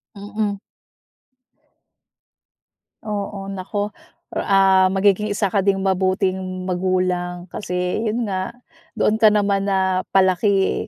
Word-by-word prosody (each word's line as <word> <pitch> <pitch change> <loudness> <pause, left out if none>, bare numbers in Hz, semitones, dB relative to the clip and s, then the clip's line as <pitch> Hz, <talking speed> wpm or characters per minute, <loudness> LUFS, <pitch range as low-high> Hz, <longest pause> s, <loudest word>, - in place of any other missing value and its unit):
Mm. 205 0 -3 2.5
Oo, 200 -1 -4
naku, 195 +2 -4 0.4
or - - -1
ah, 190 -1 +4
magiging 195 +2 +2
isa 205 0 +1
ka 200 - +3
ding 195 0 +2
mabuting 185 -1 -1
magulang, 180 -1 -1
kasi 180 0 -3
yun 230 +2 -1
nga 190 -2 -3 0.5
doon - - +2
ka 215 - +8
naman 200 -2 +1
napalaki, 190 +1 +2
195 Hz, 100 wpm, -21 LUFS, 185-205 Hz, 2.5 s, ka